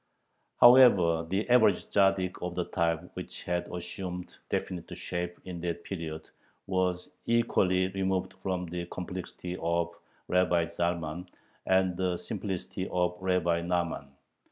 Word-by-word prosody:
However, 95 -10 +7
the 95 +4 0
average 110 -6 +4
Tzaddik 95 -2 +2
of 90 0 -3
the 90 - 0
type 85 0 -1
which - - -7
had 90 0 -1
assumed 90 0 -6
definite 90 -3 -3
shape 90 -1 -4
in 90 -2 -6
that 85 -1 -3
period 80 -4 -5 0.4
was 90 -1 -1 0.2
equally 95 -6 +3
removed 95 -1 -1
from 90 -2 -2
the 85 0 -5
complexity 90 0 -6
of 85 +1 0 0.3
Rabbi 90 -2 +3
Zalman 85 0 -2 0.4
and 95 -1 +3
the 90 -1 0
simplicity 95 -2 -4
of 90 -1 +1
Rabbi 90 -2 +1
Nahman. 85 -4 -1
90 Hz, 125 wpm, -29 LUFS, 85-95 Hz, 0.4 s, However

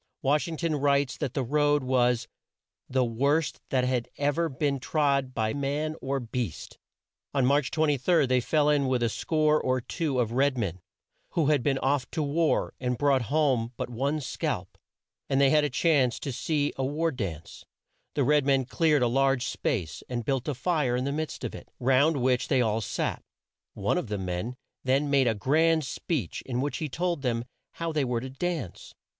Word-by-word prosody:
Wash 145 +5 +2
ing 165 -1 -5
ton 165 -1 -1
writes 140 -1 +2
that 135 -4 -3
the 135 - 0
road 145 +2 +2
was 125 -2 +2 0.6
"the 130 -1 +2
worst 140 +7 0
that 130 -2 +1
had 125 -2 0
ever 145 +4 +1
been 140 0 -1
trod 140 -2 0
by 110 0 0
man 145 +2 -2
or 135 +1 -1
beast." 120 -7 -5 0.6
On 135 -2 +3
March 140 +1 +2
23, 155 +1 +2
they 130 0 +2
fell 145 +5 +2
in 145 -2 +3
with 125 -2 +1
a 115 - +2
score 155 +5 +1
or 130 0 +1
two 145 +2 -2
of 115 -2 0
red 135 +2 +2
men 95 -6 -2 0.5
who 155 -4 +2
had 145 - +2
been 135 +1 +1
off 135 -1 0
to 160 - -2
war 155 +3 +1
and 125 -1 -1
brought 140 -1 +3
home 135 -6 +1
but - - -4
one 140 +6 -1
scalp, 130 - -3 0.5
and 135 - +2
they 140 -1 +5
had 150 -1 +4
a 150 - +1
chance 135 -3 +2
to 140 - -3
see 145 +3 -1
a 135 - -1
war 155 +5 0
dance. 90 - -6 0.5
The 145 - +2
red 150 +2 +3
men 135 -1 +2
cleared 150 0 +2
a - - +4
large 135 +1 +2
space, 110 - -2
and 120 -2 -3
built 135 -1 -1
a 150 - -1
fire 135 -2 0
in 125 +1 -1
the 140 - -1
midst 155 +2 -4
of - - -3
it, - - -10
round 135 +5 +3
which 125 -1 +1
they 135 - +2
all 110 -2 +1
sat. 100 - -2 0.5
One - - 0
of - - -5
the 105 -1 -2
men 95 +6 -3 0.3
then 135 +2 +1
made 135 -3 +4
a 115 - +2
grand 160 +8 +2
speech 130 - -3
in 125 -2 -2
which 145 +2 -1
he 155 - -3
told 170 +2 -1
them 120 -3 -1 0.3
how 165 -1 -3
they 155 -2 +1
were 120 -2 -1
to 130 +1 -6
dance. 150 - -4
135 Hz, 195 wpm, -27 LUFS, 125-150 Hz, 0.6 s, they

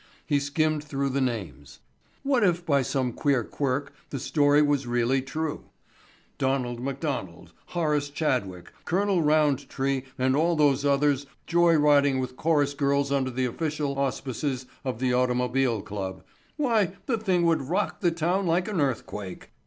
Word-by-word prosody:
He 145 -2 +2
skimmed 150 +2 0
through 140 -2 -2
the 135 +1 -1
names. 75 - -4 0.5
What 270 -5 +2
if 175 -2 +2
by 140 -4 +3
some 130 -1 -1
queer 135 -3 +1
quirk 140 +3 -2 0.2
the 140 - -4
story 145 +2 +3
was 145 -3 +1
really 120 +2 +1
true? 155 +3 -4 0.7
Donald 130 -3 0
McDonald, 135 - -4
Horace 150 -4 0
Chadwick, 125 - -2
Col. 190 0 +1
Roundtree 140 -3 +1 0.2
and 130 0 +2
all 165 +3 +2
those 145 -3 +3
others 140 0 +2 0.2
joy 170 0 +4
riding 145 -2 +4
with 130 -1 -4
chorus 145 -2 +1
girls 140 0 +1
under 135 -2 +1
the 130 +1 -1
official 145 +1 -2
auspices 130 -1 -2 0.2
of 130 -4 -3
the 125 0 0
Automobile 125 -2 +1
Club—why, 180 - -2
the 230 -4 0
thing 185 -5 +1
would 165 -1 +3
rock 195 +4 -1
the 175 - +4
town 175 +3 0
like 175 +2 +1
an 200 -7 -1
earthquake! 105 -8 -4
140 Hz, 145 wpm, -26 LUFS, 130-155 Hz, 0.7 s, joy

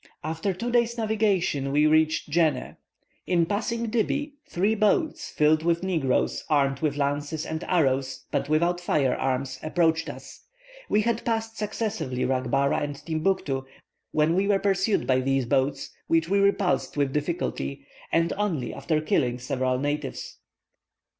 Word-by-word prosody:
"After 160 +5 -2
two 230 +7 -3
days' 235 -1 +2
navigation 205 -11 +1
we 150 +2 +3
reached 155 0 +2
Djenneh. 155 -5 +1 0.5
In 175 -2 +3
passing 225 +4 -2
Dibby, 285 +6 0 0.2
three 200 +5 +1
boats, 215 +9 +1
filled 155 +1 +3
with 170 +1 +1
negroes 160 -9 0
armed 140 -3 +2
with 150 -2 -1
lances 145 +2 -1
and 160 +1 -4
arrows, 135 -6 0
but - - -1
without 170 +3 +2
fire 145 -6 +1
arms, 130 0 -2
approached 165 0 +1
us. - - -10 0.5
We 210 - +3
had 235 +1 0
passed 225 -1 -2
successively 210 - -3
Racbara 135 +3 +1
and 145 -1 -3
Timbuctoo, 155 -2 -1 0.5
when 155 +2 +2
we 190 +3 +1
were 200 -1 +4
pursued 195 +1 +1
by 130 -1 +3
these 135 0 +1
boats, 130 +4 0 0.2
which 165 0 +2
we 200 +3 +2
repulsed 200 -5 +1
with 140 -2 +1
difficulty, 150 - -3 0.3
and 165 0 +2
only 170 - -1
after 155 -2 -1
killing 125 -5 +1
several 130 +1 -1
natives. 145 0 -4
160 Hz, 145 wpm, -26 LUFS, 140-200 Hz, 0.5 s, were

